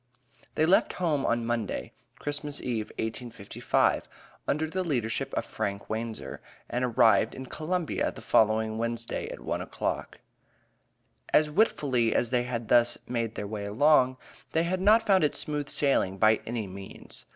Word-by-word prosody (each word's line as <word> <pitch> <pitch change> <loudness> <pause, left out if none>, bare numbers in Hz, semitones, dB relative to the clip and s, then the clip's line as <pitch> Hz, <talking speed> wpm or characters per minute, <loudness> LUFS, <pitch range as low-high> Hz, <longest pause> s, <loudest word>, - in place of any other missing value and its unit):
They 155 - +3
left 180 +4 +4
home 155 -6 0
on 115 0 +1
Monday, 115 - -2 0.2
Christmas 145 0 -3
Eve, 115 -4 -2
1855, 110 -2 -1 0.4
under 155 +2 0
the 185 +4 -2
leadership 120 -10 -1
of - - -1
Frank 100 +1 -4
Wanzer, 110 0 -4 0.3
and 125 +1 -2
arrived 115 -2 +4
in 130 - -7
Columbia 165 +5 -2
the - - -11
following 110 0 +2
Wednesday 115 0 -2
at - - -8
one - - -2
o'clock. - - -3 1.1
As 150 0 +4
willfully 135 - +2
as 120 - +1
they 120 -1 +2
had 120 -2 -4
thus 120 +1 +4
made 115 -2 -2
their 105 - -4
way 105 0 -5
along, 130 +4 +4 0.4
they 160 - +3
had 185 +2 -1
not 220 +3 +5
found 190 -3 +4
it 150 - +2
smooth 150 -1 -3
sailing 115 -9 +1
by 110 +2 +4
any 115 -2 -2
means. 95 0 -8
120 Hz, 150 wpm, -28 LUFS, 110-150 Hz, 1.1 s, not